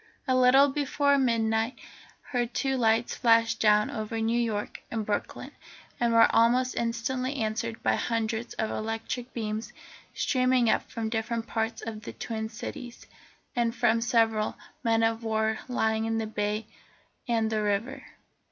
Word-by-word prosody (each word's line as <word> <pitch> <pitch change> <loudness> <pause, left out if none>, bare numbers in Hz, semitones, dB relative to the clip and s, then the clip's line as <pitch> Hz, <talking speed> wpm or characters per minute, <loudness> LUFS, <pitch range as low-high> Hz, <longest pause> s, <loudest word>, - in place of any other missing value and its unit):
A 260 - +3
little 255 +2 +6
before 285 0 +1
midnight 225 -1 +1 0.5
her 245 -2 +1
two 265 +3 -1
lights 230 -1 +2
flashed 230 -1 +3
down 210 -1 +4
over 220 +1 -4
New 225 +2 +1
York 215 -3 -3
and 220 -2 -3
Brooklyn, 205 - -3 0.5
and 235 -1 +2
were 230 0 +7
almost 250 +3 +3
instantly 255 +3 -2
answered 225 -1 -3
by - - +3
hundreds 230 0 -2
of 220 - -2
electric 225 +3 -4
beams 215 -1 -4 0.4
streaming 255 -3 +2
up - - -1
from 225 -2 -3
different 225 0 -2
parts 225 0 -2
of 220 -2 -6
the 220 - -8
Twin 220 -1 -4
Cities, 240 +2 -8 0.5
and 235 -1 0
from 230 +1 +2
several 225 -2 +1 0.3
men 225 -1 +2
of 225 +1 +1
war 220 0 0
lying 220 -3 0
in 225 0 -1
the 225 - -1
bay 210 0 -2 0.6
and 225 -2 +1
the 215 -1 0
river. 210 +6 -1
230 Hz, 150 wpm, -28 LUFS, 220-240 Hz, 0.6 s, were